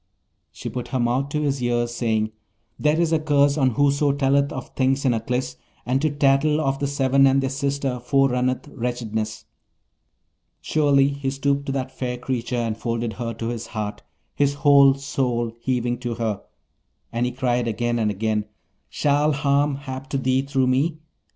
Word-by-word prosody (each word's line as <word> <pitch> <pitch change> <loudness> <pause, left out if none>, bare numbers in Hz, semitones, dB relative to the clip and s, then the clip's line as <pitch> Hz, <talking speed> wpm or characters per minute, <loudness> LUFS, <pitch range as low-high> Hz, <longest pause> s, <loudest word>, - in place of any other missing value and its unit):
She - - -8
put 125 -1 -4
her 130 - -2
mouth 125 +4 0
to 150 +1 -1
his 140 -2 -1
ear, 120 -1 +1
saying, 110 -2 -1 0.5
'There 150 +2 +2
is 165 -1 +2
a 160 - +3
curse 145 -2 +3
on 130 -6 +1
whoso 145 0 +3
telleth 140 0 +2
of 130 - -6
things 135 +1 0
in 125 - +4
Aklis, 115 - -2 0.3
and 130 +2 +1
to 155 - +2
tattle 145 +1 +2
of 135 -2 0
the 140 - 0
Seven 135 -1 +3
and 135 0 +3
their 135 -1 -1
sister 140 -2 -2
forerunneth 130 0 +1
wretchedness.' 110 -3 -4 1.1
Surely, 140 -3 +3
he 140 -1 -3
stooped 140 +1 -1
to - - -1
that 130 -1 -3
fair 125 -1 -3
creature, 125 -1 -3
and 115 -2 -2
folded 115 -1 -2
her 115 +3 -4
to 115 0 -4
his 120 -1 -5
heart, 105 -2 -5 0.3
his 140 0 +1
whole 140 -2 +6
soul 125 -4 -1
heaving 120 -1 -1
to 120 -2 -3
her; 110 -3 -2 0.7
and 120 +2 0
he - - -2
cried 120 -2 0
again 120 +1 -1
and 110 -2 +1
again, 105 +1 -1 0.4
'Shall 150 +1 +2
harm 145 0 +1
hap 135 -1 -7
to 135 - -1
thee 130 0 +1
through 135 -1 0
me? 140 +6 +1
130 Hz, 175 wpm, -23 LUFS, 120-140 Hz, 1.1 s, whole